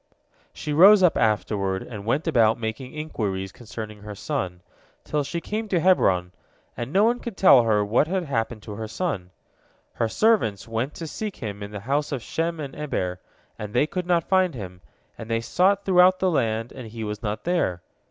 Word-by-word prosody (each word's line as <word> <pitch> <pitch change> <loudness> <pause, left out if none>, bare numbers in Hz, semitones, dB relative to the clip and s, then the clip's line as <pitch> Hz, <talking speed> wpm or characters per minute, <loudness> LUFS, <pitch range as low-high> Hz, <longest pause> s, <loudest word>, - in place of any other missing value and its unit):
She 150 - -5
rose 190 +5 +8
up 180 - +5
afterward 100 -3 0
and 105 -3 -9
went 140 +7 +1
about 115 -9 +3
making 115 +3 -4
inquiries 100 -11 -3
concerning 105 -2 -8
her 105 0 -8
son, 95 -7 -3 0.4
till 150 -1 -1
she 155 +5 -3
came 215 +5 -4
to 185 -4 +1
Hebron, 95 - +3 0.4
and 120 +3 -5
no 195 +5 +4
one 240 +2 +2
could 230 -5 -7
tell 140 -9 +7
her 105 -3 +2
what 115 +8 +2
had 185 +1 -1
happened 115 -6 -3
to - - -8
her 110 +1 -5
son. 110 - -3 0.6
Her 115 - -1
servants 200 - +2
went 115 +5 -3
to 165 - -6
seek 210 +5 -5
him 105 -4 -6
in 100 - -5
the 105 -1 -7
house 140 +6 -1
of 130 -5 -3
Shem 165 +4 -2
and 140 -3 -6
Eber, 90 -12 -3 0.4
and 105 +1 -6
they 135 - +4
could 180 +3 -4
not 170 -2 +2
find 185 -4 +2
him, 90 -5 -8 0.4
and 115 - -8
they 115 0 +1
sought 195 +11 +2
throughout 185 0 +5
the 185 -1 +1
land, 115 -5 0
and 125 -4 -9
he 110 +1 -7
was 105 -1 -4
not 105 -2 -3
there. 165 - 0
120 Hz, 195 wpm, -24 LUFS, 105-170 Hz, 0.6 s, rose